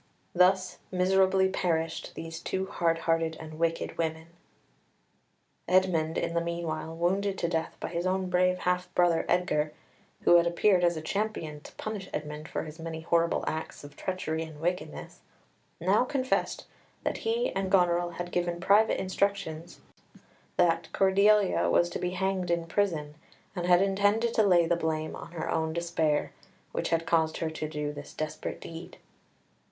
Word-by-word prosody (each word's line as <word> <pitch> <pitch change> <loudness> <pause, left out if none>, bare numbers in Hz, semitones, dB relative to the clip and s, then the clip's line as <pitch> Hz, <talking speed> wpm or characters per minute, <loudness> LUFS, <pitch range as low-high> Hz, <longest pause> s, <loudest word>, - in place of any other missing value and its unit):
Thus 185 +1 +3
miserably 190 +1 +3
perished 165 -3 -2
these 165 0 -6
two 190 +2 -2
hard 165 -3 0
hearted 165 -1 +1
and 155 0 -9
wicked 165 0 -1
women. 160 0 -2 1.4
Edmund 175 -3 +2
in - - -1
the 170 - +1
meanwhile, 165 -1 -3
wounded 190 +3 0
to 170 - 0
death 165 -1 -2
by - - -4
his 170 +2 -2
own 190 0 0
brave 180 0 +2
half 180 0 -1
brother 175 -2 +3
Edgar, 155 -4 +1 0.5
who 175 - +7
had 170 0 +3
appeared 180 +2 +3
as 170 -2 +2
champion 165 -6 -3
to - - -12
punish 210 -3 -5
Edmund 150 +1 -5
for - - -3
his 155 +1 -10
many 160 -1 -5
horrible 170 +1 +1
acts 160 -1 -4
of 145 0 -11
treachery 160 -3 -3
and 160 -2 -7
wickedness, 165 - -4 0.6
now 190 +7 +3
confessed 260 0 -1 0.4
that - - -1
he 465 +2 0
and 195 -1 -2
Goneril 175 -2 +3
had 175 0 -4
given 175 -1 -1
private 205 +5 +4
instructions 185 -3 -2 0.8
that 170 -2 +2
Cordelia 200 +1 +4
was 175 0 +3
to - - -3
be 180 - -1
hanged 190 -1 -1
in 170 -1 +1
prison, 165 -5 -1 0.4
and 175 -1 -2
had 180 +1 +6
intended 205 +4 +2
to - - +4
lay 180 -5 +5
the 170 +1 +2
blame 160 -2 -2
on - - -10
her 165 - -4
own 160 0 0
despair, 165 -3 0 0.4
which - - -2
had 165 0 +1
caused 160 -1 +2
her 160 -1 -2
to 155 -1 -4
do 150 -1 -3
this 145 0 -10
desperate 155 0 -4
deed. 165 +1 -9
175 Hz, 160 wpm, -29 LUFS, 160-190 Hz, 1.4 s, who